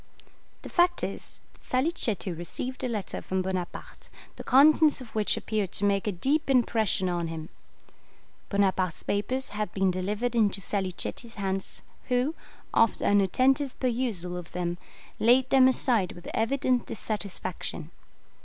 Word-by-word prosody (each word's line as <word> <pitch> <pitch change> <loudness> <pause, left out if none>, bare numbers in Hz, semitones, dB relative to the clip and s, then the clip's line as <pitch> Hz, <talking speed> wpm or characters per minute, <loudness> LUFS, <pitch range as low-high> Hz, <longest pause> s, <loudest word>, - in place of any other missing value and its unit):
The - - -7
fact 350 0 +2
is, - - -5
that - - -26
Salicetti 255 - 0
received 245 +10 -4
a - - +1
letter 215 -5 -2
from 185 0 -2
Bonaparte, 185 -2 -5 0.3
the - - -8
contents 300 +3 +5
of 255 -3 -10
which 215 -1 +1
appeared 210 -4 -2
to 205 - 0
make 200 0 +1
a - - +2
deep 275 - 0
impression 225 -7 +2
on 175 -2 -1
him. 160 -1 -6 1.0
Bonaparte's 190 -4 +1
papers 250 +7 -1
had 210 0 -3
been 190 -1 +2
delivered 205 +6 -2
into 210 -4 +2
Salicetti's 195 +4 -3
hands, 195 -2 -2 0.2
who, 250 +4 +1 0.4
after 225 - +3
an 205 0 +5
attentive 260 +7 +1
perusal 230 -9 -1
of 175 -1 -9
them, 175 0 -2 0.4
laid 245 +3 +5
them 265 -1 +7
aside 240 -7 +2
with 175 - -12
evident 250 +1 +1
dissatisfaction. 190 -6 -4
210 Hz, 140 wpm, -27 LUFS, 185-255 Hz, 1.0 s, them